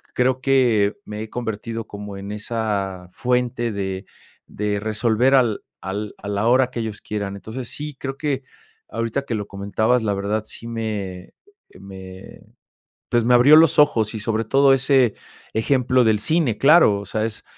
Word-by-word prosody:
creo 130 +1 +1
que 120 -7 +2
me 105 0 -6
he 110 - -6
convertido 115 -1 -4
como 100 -1 -8
en 100 +1 -7
esa 105 -4 -3
fuente 125 -1 -1
de 95 -1 -4 0.4
de 105 0 -2
resolver 110 +4 +2
al 120 -5 +2 0.2
al 100 +2 -4
a - - -10
la 100 +2 0
hora 130 +1 +4
que 120 - -5
ellos 110 -2 -5
quieran. 100 -2 -4
Entonces, 115 +4 -7
sí, 150 -1 -5
creo 135 0 -5
que 140 -3 -2 0.5
ahorita 115 +4 -2
que 135 -4 -4
lo 105 -1 -3
comentabas, 100 +5 0
la 105 -2 0
verdad, 100 +2 -2
sí 115 - -8
me, 105 -6 -5 0.4
eh, - - -17
me, 95 -1 -11 0.7
pues, 120 -1 +2
me 125 - +4
abrió 130 +5 +7
los 160 -2 +5
ojos 115 -8 +3
y - - -4
sobre 110 +1 -1
todo 135 +4 +4
ese 130 -3 +3 0.4
ejemplo 125 +2 +2
del 110 -1 +3
cine, 150 -4 +1
claro, 140 -9 +5
o 100 - -8
sea, 110 +2 -2
es 110 -1 -6
110 Hz, 170 wpm, -22 LUFS, 100-125 Hz, 0.7 s, abrió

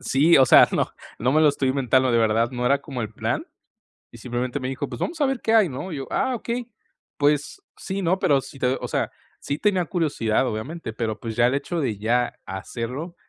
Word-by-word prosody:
Sí, 155 +6 +4
o 130 - +6
sea, - - +8
no - - +1 0.3
no 125 +3 +1
me 155 - +4
lo 155 - +6
estoy 140 -2 0
inventando, 130 -1 +2
de 115 - +4
verdad 115 +1 +2
,no 125 0 -3
era 140 +2 +3
como 135 -5 -5
el 110 0 -5
plan, - - -2 0.7
y - - -12
simplemente 125 +3 -3
me 130 - -4
dijo: 135 +2 -3
"Pues - - -7
vamos 330 0 -3
a - - +5
ver 270 -2 -1
qué 225 - +1
hay, 215 -6 +5
¿no?". 145 +8 -6
Y 150 - -4
yo: 135 - -6
"Ah, 260 - 0
okey, 240 +1 -4 0.5
pues 145 - +1 0.2
sí, 195 0 -4
¿no?". 185 +1 +1
Pero 140 -6 +3
si 135 - -12
te 130 +1 +1
o - - -3
sea, - - -1 0.3
sí 145 - -3
tenía 190 -1 +1
curiosidad, 145 - 0
obviamente, 125 +5 -5
pero 110 -1 -3
pues, 115 -1 -5
ya 120 - +5
el 125 - 0
hecho 170 +4 -2
de 120 -9 -1
ya 120 +4 0
hacerlo 125 - -5
135 Hz, 230 wpm, -23 LUFS, 120-170 Hz, 0.7 s, sea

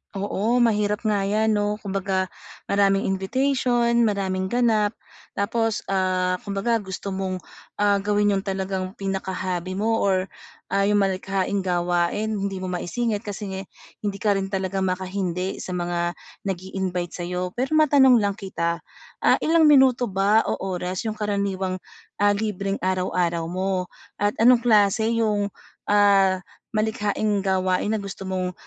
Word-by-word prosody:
Oo, 215 +5 +1
mahirap 210 -1 +1
nga 205 -2 +1
'yan 215 +2 +2
'no 205 0 +1
kumbaga, 190 -1 -1 0.4
maraming 195 -1 +3
invitation, 240 +4 +1 0.2
maraming 190 -2 -1
ganap. 225 -2 +2 0.4
Tapos, 225 +2 0
ah, 185 -1 +1
kumbaga 205 +4 0
gusto 195 0 -6
mong, 190 -1 -3 0.3
ah, 205 -1 +3
gawin 205 +1 +2
'yung 195 - +1
talagang 190 0 -3
pinaka-hobby 185 -2 -3
mo 225 +3 +1
or, 190 -2 +2 0.5
ah, 195 0 +2
'yung 210 - +3
malikhaing 195 +1 -1
gawain, 175 +3 0
hindi 195 0 -2
mo 185 - -3
maisingit 210 +5 -1
kasi 195 -2 -6 0.3
hindi 200 -2 -3
ka 200 -2 +1
rin 195 - -3
talaga 190 0 -2
makahindi 185 0 -2
sa 180 - -5
mga 175 0 -1 0.3
nag-i-invite 185 -1 -3
sa'yo. 180 +1 -3
Pero 260 +7 -1
matanong 275 -4 +6
lang 205 -3 +2
kita, 170 -4 -2 0.4
ah, - - +4
ilang 320 -1 +5
minuto 260 -4 +5
ba 200 +3 +3
o - - 0 0.2
oras 180 +3 -3
'yung 215 -1 -4
karaniwang, 200 -2 -1 0.5
ah, 205 - +6
libreng 200 -2 -2
araw-araw 180 -2 0
mo 185 +1 -2 0.2
at 205 0 +1
anong 240 +1 +6
klase 220 0 +3
'yung, 205 -2 +1 0.4
ah, 195 -2 +5 0.4
malikhaing 210 -1 0
gawain 190 +1 +1
na - - 0
gusto 200 -1 -7
mong 185 -1 -2
195 Hz, 135 wpm, -24 LUFS, 185-210 Hz, 0.5 s, matanong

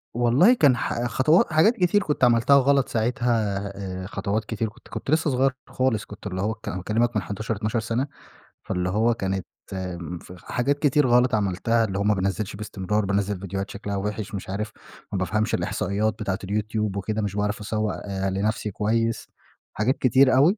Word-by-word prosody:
والله 125 - +5
كان 140 - +4
ح 120 - -2
خطوا 155 - +3
حاجات 165 +10 +5
كتير 185 +2 +3
كنت 150 -5 -2
عملتها 120 +3 +5
غلط 140 0 +3
ساعتها، 120 +2 0 0.7
آآ، - - -6
خطوات 105 +2 -2
كتير 110 0 -2
كنت - - -19
كنت 135 - -5
لسّه 160 -1 +3
صغيّر 130 +1 +3 0.2
خالص، 130 -5 0
كنت 100 0 -9
اللي 95 -1 -3
هو 110 +2 0
ك 110 - -14
أنا 95 - -2
باكلمك 110 +5 0
من 105 - +2
11 105 +5 -3
12 105 +3 -1
سنة، 115 +5 -1 0.6
فاللي 90 -1 -1
هو 110 +5 +2
كانت 95 -3 -2 0.3
امم، 90 -2 -5
ف 90 - -12
حاجات 140 +3 0
كتير 145 -2 +3
غلط 125 -1 +4
عملتها، 105 +3 +1
اللي 95 -2 -3
هو - - +1
ما 105 +1 +3
بانزّلش 100 +2 -2
باستمرار، 105 0 -2
بانزّل 100 0 0
ڤيديوهات 100 +1 -4
شكلها 100 0 -5
وحِش 105 +1 -3
مش 95 - -6
عارف 105 +3 -3 0.4
ما 100 - -1
بافهمش 110 +4 0
الإحصائيات 105 +3 -1
بتاعة 95 -3 -2
اليوتيوب 105 0 -1
وكده، 105 +2 -2
مش 100 -1 -3
باعرف 105 +1 -1
أسوّق 105 -1 -2 0.3
لنفسي 105 +2 -1
كويّس، 115 +3 0 0.5
حاجات 120 +6 +1
كتير 130 +1 +4
أوي، 165 +11 +5
110 Hz, 180 wpm, -24 LUFS, 100-125 Hz, 0.7 s, والله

